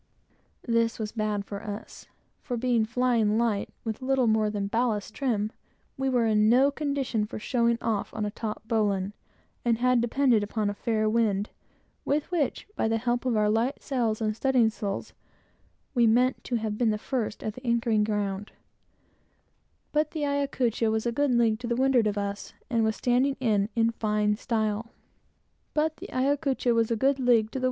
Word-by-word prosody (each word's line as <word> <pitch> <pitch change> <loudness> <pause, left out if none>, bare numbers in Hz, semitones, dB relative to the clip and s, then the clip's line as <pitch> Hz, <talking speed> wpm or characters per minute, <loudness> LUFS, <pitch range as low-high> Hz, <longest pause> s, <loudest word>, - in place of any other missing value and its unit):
This 230 0 +1
was 215 -2 -4
bad 210 -2 -2
for 200 0 -6
us, 210 +1 -8 0.3
for, 245 -3 -4
being 235 -2 +2
"flying 230 -2 +1
light," 225 -4 0
with 220 +2 -4
little 260 -1 +2
more 220 -1 +2
than 205 -1 -2
ballast 215 -1 -1
trim, 220 -6 -1 0.4
we 270 0 -1
were 245 -3 +2
in 215 -1 +3
no 265 +4 +5
condition 280 -6 -1
for 210 - -5
showing 235 +1 +1
off 215 -3 -1
on 215 -1 -3
a 205 - -3
taut 220 0 -6
bowline, 205 -3 0 0.5
and 235 -2 +2
had 250 0 +3
depended 240 -1 +3
upon 205 0 -1
a - - -5
fair 215 +1 0
wind, 215 -2 +1 0.5
with 295 +4 -1
which, 320 -6 -1
by - - 0
the 225 0 +1
help 240 +2 -1
of 235 -3 +1
our 210 0 +3
light 225 +5 0
sails 235 -5 -1
and 215 -1 0
studding 245 -2 +3
sails, 200 -3 -4 0.8
we 240 -3 +4
meant 250 +3 +2
to 245 - -2
have 215 -2 -2
been 240 -2 +3
the 215 - +1
first 225 -1 -3
at 215 - -3
the 255 - -12
anchoring 230 -3 +2
ground; 205 -1 -2 1.4
but 305 0 +1
the 305 -2 -2
Ayacucho 265 -5 0
was 220 +1 -1
a 235 - +1
good 285 +4 +1
league 225 -2 +3
to 245 - -5
windward 245 -1 +3
of 205 0 -1
us, 200 0 -4 0.2
and 230 -2 +2
was 220 0 +1
standing 255 +3 +1
in, 210 -5 +1
in 230 0 +3
fine 210 -2 0
style. 220 -1 -1
225 Hz, 160 wpm, -27 LUFS, 215-245 Hz, 1.4 s, no